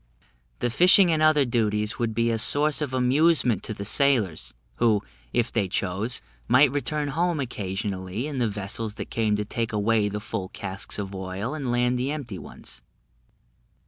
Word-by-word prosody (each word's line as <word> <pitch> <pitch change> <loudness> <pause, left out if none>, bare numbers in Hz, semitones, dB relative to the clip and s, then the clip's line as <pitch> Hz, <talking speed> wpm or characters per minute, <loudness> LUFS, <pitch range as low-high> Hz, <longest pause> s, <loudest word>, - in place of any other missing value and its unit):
The 120 - 0
fishing 180 - +6
and 155 -1 +1
other 155 -2 +5
duties 105 -3 0
would 115 -2 -1
be 115 +1 +2
a 115 - 0
source 150 +6 +2
of 145 -3 -2
amusement 130 - +3
to - - -4
the 100 - -6
sailors, 100 - +1 0.2
who, 110 -4 +2 0.3
if 120 0 0
they 105 -5 +1
chose, 100 +5 -2 0.2
might 130 +3 +5
return 145 +1 -2
home 170 +2 0
occasionally 100 -3 -4
in 145 -3 -4
the 120 -3 +1
vessels 105 +2 -4
that 105 - -7
came 110 -2 +1
to 105 0 -2
take 115 +2 -3
away 105 0 +1
the 105 +1 -4
full 95 -4 -5
casks 100 -1 -3
of 100 -1 -5
oil 95 +6 -4
and 140 -5 -3
land 125 +1 +1
the 130 +2 -1
empty 135 - -5
ones." - - -10
115 Hz, 175 wpm, -25 LUFS, 105-140 Hz, 0.3 s, fishing